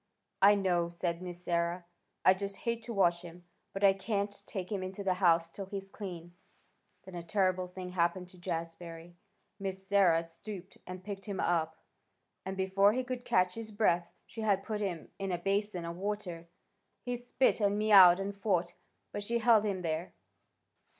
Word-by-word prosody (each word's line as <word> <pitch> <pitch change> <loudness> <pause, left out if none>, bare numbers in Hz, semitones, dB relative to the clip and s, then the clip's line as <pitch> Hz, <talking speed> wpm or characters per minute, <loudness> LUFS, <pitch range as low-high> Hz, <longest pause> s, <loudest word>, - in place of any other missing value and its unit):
"I 205 +1 +8
know," 175 -4 +1
said 170 0 -3
Miss 180 -1 -6
Sarah. 170 +1 0 0.4
"I 185 - +8
just 200 +1 -4
hate 235 0 0
to 240 - -6
wash 175 -3 +3
him, 175 0 -12 0.3
but 195 - -5
I 195 -1 +7
can't 200 +1 -2
take 190 -2 -5
him 200 -2 -1
into 185 +2 -5
the 190 -1 +2
house 170 -3 +3
till 195 +1 -7
he's 195 0 -6
clean." 175 -4 -7 0.7
Then 190 - -12
a 175 - -5
terrible 185 +1 +1
thing 180 0 -7
happened 180 0 0
to 180 - -16
Jazbury. 170 -1 -5 0.5
Miss 190 -1 -4
Sarah 190 -4 +4
stooped 185 +3 -10
and 185 0 -7
picked 195 -1 -6
him 200 -2 -4
up, 160 -2 0 0.7
and 190 0 -5
before 195 +2 +3
he 255 +2 0
could 250 -1 -5
catch 180 -4 +2
his 225 -1 -7
breath 190 -5 +1
she 225 - -8
had 200 -3 +2
put 210 0 -3
him 180 -6 -4
in 195 -1 -2
a 175 - 0
basin 195 0 -1
of 170 0 -5
water. 190 -4 -4 0.6
He 245 -1 -2
spit 245 +1 +1
and 205 0 +2
mewed 195 -4 +8
and 195 +1 -3
fought, 180 -4 0 0.4
but 205 - -4
she 235 +3 -1
held 225 -2 +5
him 190 -3 -2
there. 165 +2 -2
190 Hz, 180 wpm, -32 LUFS, 175-200 Hz, 0.7 s, I